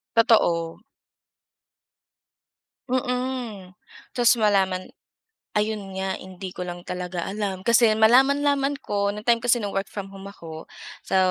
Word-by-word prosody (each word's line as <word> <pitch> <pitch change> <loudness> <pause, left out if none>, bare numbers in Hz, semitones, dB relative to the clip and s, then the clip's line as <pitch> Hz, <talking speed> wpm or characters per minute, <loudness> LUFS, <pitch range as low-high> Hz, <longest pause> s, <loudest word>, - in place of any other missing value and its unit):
Totoo. 175 -8 +3 2.1
Mm, 250 -6 -3 0.3
tapos 245 0 +4
malaman 190 -3 +2 0.7
ayun 215 0 +1 0.2
nga 190 0 -1
hindi 185 0 -8
ko 180 - -5
lang 175 0 -6
talaga 180 -1 -4
alam. 195 -2 -3
Kasi 235 -2 +5
malaman-laman 275 +4 +4
ko, 200 0 0
nang 210 - -7
time 235 -1 +5
kasi 245 0 +3
na 205 -2 -3
work 195 0 -1
from 200 -2 -6
home 195 0 -11
ako, 160 -5 -10 0.4
so, - - 0
205 Hz, 120 wpm, -24 LUFS, 185-240 Hz, 2.1 s, Kasi